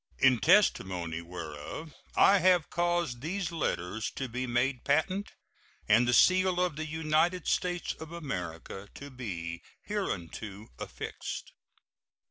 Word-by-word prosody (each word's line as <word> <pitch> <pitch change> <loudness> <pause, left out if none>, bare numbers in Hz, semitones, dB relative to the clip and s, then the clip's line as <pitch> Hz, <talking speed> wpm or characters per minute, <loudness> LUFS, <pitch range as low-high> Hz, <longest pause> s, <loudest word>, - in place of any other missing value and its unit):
In 130 -3 +5
testimony 90 - +3
whereof 85 - -7 0.2
I 200 0 +6
have 180 -2 +3
caused 175 -7 0
these 175 +4 -2
letters 110 - -2
to 135 - -3
be 125 +2 -3
made 125 +1 0
patent 160 +8 +1 0.5
and 115 +3 +5
the - - +3
seal 185 +5 +5
of 180 -4 +1
the 155 +1 -4
United 160 +3 +1
States 175 -1 0
of 160 0 -8
America 95 - -5
to 140 0 -9
be 85 -10 -5 0.2
hereunto 105 - -4
affixed. - - -6
135 Hz, 120 wpm, -30 LUFS, -, 0.5 s, I